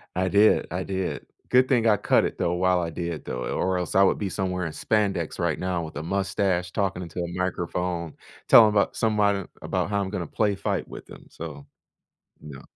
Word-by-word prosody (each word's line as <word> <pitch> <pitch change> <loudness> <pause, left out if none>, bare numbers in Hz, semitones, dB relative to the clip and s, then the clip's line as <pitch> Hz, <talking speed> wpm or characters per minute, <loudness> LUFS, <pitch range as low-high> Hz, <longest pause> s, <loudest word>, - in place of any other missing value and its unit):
I 95 +1 +1
did, 105 +3 +4
I 90 +1 -2
did, 95 -1 -3 0.2
good 130 +1 +4
thing 120 -4 +2
I 105 - +5
cut - - +3
it, - - -4
though, 85 - 0
while 90 0 +2
I 85 - -2
did, 85 -1 -5
though, 60 0 -4
or 95 0 -1
else 90 - -4
I 95 - +6
would 95 - +3
be 100 - -3
somewhere 90 -1 -2
in 80 - -3
spandex 100 -3 -1
right 85 -3 0
now 90 -2 -2
with 80 - -8
a 75 - -4
mustache, 95 0 -1
talking 95 -2 -1
into 85 +1 -7
a - - -3
microphone, 90 -2 -2 0.3
telling 110 -2 +8
about 100 -1 +1
somebody 105 -3 +1 0.2
about - - -2
how 100 -1 0
I'm 95 - -3
gonna 90 -5 -4
play 105 +2 0
fight - - -2
with - - -10
them, - - -14
so 75 -4 -9 0.8
no. 70 -3 -10
95 Hz, 205 wpm, -25 LUFS, 85-100 Hz, 0.8 s, telling